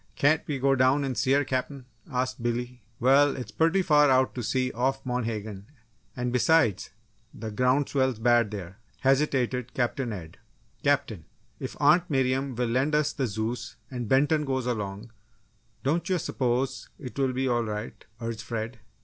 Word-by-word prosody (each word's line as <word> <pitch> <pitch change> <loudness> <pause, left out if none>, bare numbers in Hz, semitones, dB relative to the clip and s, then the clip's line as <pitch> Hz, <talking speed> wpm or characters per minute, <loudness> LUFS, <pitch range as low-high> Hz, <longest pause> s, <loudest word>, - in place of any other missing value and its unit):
"Can't 150 +3 +3
we 145 - -1
go 135 +1 +3
down 130 +2 +3
and 135 -2 -2
see 130 +3 +2
her, 145 +1 +4
Captain?" 130 0 -3 0.3
asked 130 -1 -2
Billy. 120 +1 -3 0.2
"Well, 140 +3 +4
it's 125 -5 -6
purty 165 +4 +2
far 150 -3 +5
out 130 0 +3
to 125 - -4
sea 125 +3 0
off 135 +3 -1
Monhegan; 110 -5 -3 0.5
and, 125 0 -2
besides, 125 - +3 0.5
the 110 -1 -6
ground 125 +5 +2
swell's 130 -4 +1
bad 120 -1 +3
there," 100 -1 -7 0.2
hesitated 130 -3 +1
Captain 125 0 -1
Ed. 85 -5 -8 0.4
"Captain, 135 - 0 0.3
if - - -6
Aunt 175 +4 +4
Miriam 135 -1 0
will 120 0 -1
lend 135 +6 +1
us 150 0 +1
the 135 -3 -1
Zeus 110 +3 -4 0.2
and 120 -4 -4
Benton 150 +3 +3
goes 130 -3 -1
along, 105 -2 -4 0.7
don't 160 +7 0
you 185 - +2
s'pose 130 -4 -1
it 130 -4 -9
will 135 -1 +2
be 130 +1 -1
all 120 -2 +1
right!" 105 0 -5 0.2
urged 115 -2 -4
Fred. 115 0 -5
125 Hz, 165 wpm, -27 LUFS, 115-135 Hz, 0.7 s, far